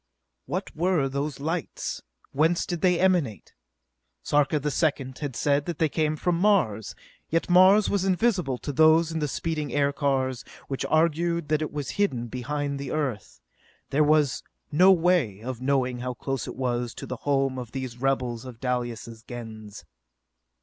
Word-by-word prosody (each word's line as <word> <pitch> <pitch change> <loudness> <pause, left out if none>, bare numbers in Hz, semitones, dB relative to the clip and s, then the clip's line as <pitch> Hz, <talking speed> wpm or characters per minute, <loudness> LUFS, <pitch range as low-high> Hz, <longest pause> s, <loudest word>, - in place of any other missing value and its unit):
What - - -4
were 170 -4 +1
those 140 +2 -3
lights? 160 +4 -3 0.3
Whence 160 +5 +2
did 175 -3 -4
they 180 -2 +3
emanate? 170 - +1 0.7
Sarka 145 +1 +2
the 150 +1 -2
Second 135 -4 -1
had 145 -5 -4
said 145 +2 +1
that 170 -3 -3
they 160 - +2
came 155 0 0
from 170 +2 0
Mars, 175 - +2 0.3
yet 165 +2 0
Mars 190 +3 +6
was 200 -2 0
invisible 185 - +1
to 145 - -5
those 160 +3 +5
in 160 - -2
the 150 - 0
speeding 155 0 -3
aircars, 140 -3 0 0.2
which 135 - -3
argued 170 0 +1
that 155 0 +2
it 155 - -3
was 145 -2 -4
hidden 120 -12 0
behind 140 +3 -3
the 140 - -5
Earth. 140 -9 -3 0.5
There 150 +3 +3
was 150 -2 +3 0.3
no 180 +6 +6
way 165 - +2
of 125 -1 -5
knowing 130 -2 0
how 125 0 -4
close 135 -1 -3
it - - -6
was 120 -2 -2
to - - -7
the 125 - -5
home 135 -1 0
of 120 -2 -7
these 130 -3 -5
rebels 125 -3 -1
of 125 -3 -10
Dalis' 120 -3 -3
Gens. 110 -6 -9
145 Hz, 165 wpm, -26 LUFS, 125-165 Hz, 0.7 s, Mars